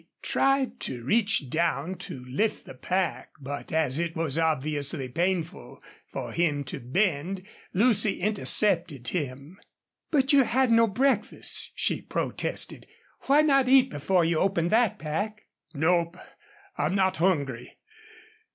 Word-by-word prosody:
He - - -39 0.2
tried 270 -1 +1
to 120 -2 -4
reach 200 - +1
down 165 0 0 0.2
to 125 -1 -8
lift 145 - -1
the - - -10
pack, 180 +7 -2
but 145 +1 -7
as 155 -3 +1
it 170 -1 -2
was 160 -4 -1
obviously 150 -2 -1
painful 175 +5 -3 0.3
for - - -5
him 150 -4 0
to 130 - -6
bend, 180 - -1 0.3
Lucy 210 0 +3
intercepted 175 - +1
him. 145 +2 -5 0.5
"But 280 -2 +2
you've 275 -3 +5
had 255 0 +2
no 230 0 +5
breakfast," 240 +1 +1
she - - 0
protested. - - -3 0.4
"Why 290 +3 +5
not 275 -3 +3
eat 265 0 +5
before 170 +4 +1
you 165 -1 +1
open 175 -3 +1
that 225 0 +2
pack?" 205 +8 -4 0.3
"Nope. 170 +3 +1 0.6
I'm 190 - 0
not 190 -1 +1
hungry.... 140 -9 -1
175 Hz, 135 wpm, -27 LUFS, 145-215 Hz, 0.6 s, you've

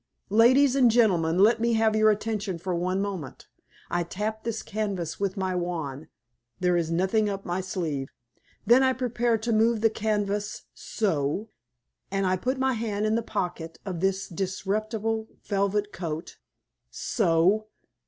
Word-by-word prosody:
Ladies 255 +5 +5
and 255 -3 +5
gentlemen, 180 -8 +3
let 225 +4 +5
me 235 0 +2
have 220 -1 +3
your 215 0 +5
attention 210 -3 -1
for 180 +2 -3
one 185 +3 0
moment. 185 -10 -6 0.5
I 175 - +1
tap 210 +5 -4
this 225 -1 -3
canvas 200 -6 -3
with 200 0 -1
my 190 -1 -1
wand 160 -5 -3 0.5
there 180 -1 +2
is 170 -2 0
nothing 190 +5 +1
up 195 -1 -5
my 175 +2 -1
sleeve. 160 -7 -3 0.6
Then 245 +3 +6
I 260 0 +4
prepare 240 -2 0
to 225 +1 -1
move 220 0 +3
the 225 -1 +4
canvas 210 -1 -2
so. 190 0 -1 0.6
And 195 0 0
I 185 0 +2
put 255 +8 -1
my 265 0 +1
hand 215 -2 -2
in 215 - +1
the 230 - +1
pocket 175 -7 -4
of 185 -4 -4
this 195 +1 0
disreputable 215 +4 -2 0.2
velvet 205 +1 0
coat, 165 -3 -5 0.5
so. 190 +2 +1
205 Hz, 155 wpm, -26 LUFS, 180-220 Hz, 0.6 s, Then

